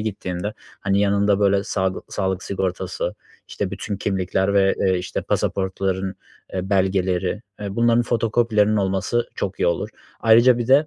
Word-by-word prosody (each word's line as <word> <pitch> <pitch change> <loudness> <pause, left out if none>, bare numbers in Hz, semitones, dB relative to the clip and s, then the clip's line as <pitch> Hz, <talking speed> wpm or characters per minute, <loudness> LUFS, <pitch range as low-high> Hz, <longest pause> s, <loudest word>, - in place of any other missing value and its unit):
gittiğinde, 100 -1 -3 0.3
hani, 100 0 +1
yanında, 100 0 +2
böyle, 100 0 +3
saglı 95 -1 -1
sağlık 95 -1 -2
sigortası, 95 -1 -3 0.3
işte, - - -3
bütün 100 - -4
kimlikler 95 0 0
ve, 95 -1 +4
eee, 95 -2 +2
işte, 90 - -4
pasaportların, 95 0 -1 0.4
eee, 95 +1 -3
belgeleri, 95 +1 +1 0.2
eee, 100 -1 -5
bunların 120 0 +4
fotokopilerinin 115 -2 +2
olması 100 +4 0
çok 95 - -4
iyi - - +3
olur. 85 -1 0 0.3
Ayrıca 120 +2 +6
bir 120 - -2
de, 145 +3 +5
100 Hz, 145 wpm, -22 LUFS, 95-105 Hz, 0.4 s, Ayrıca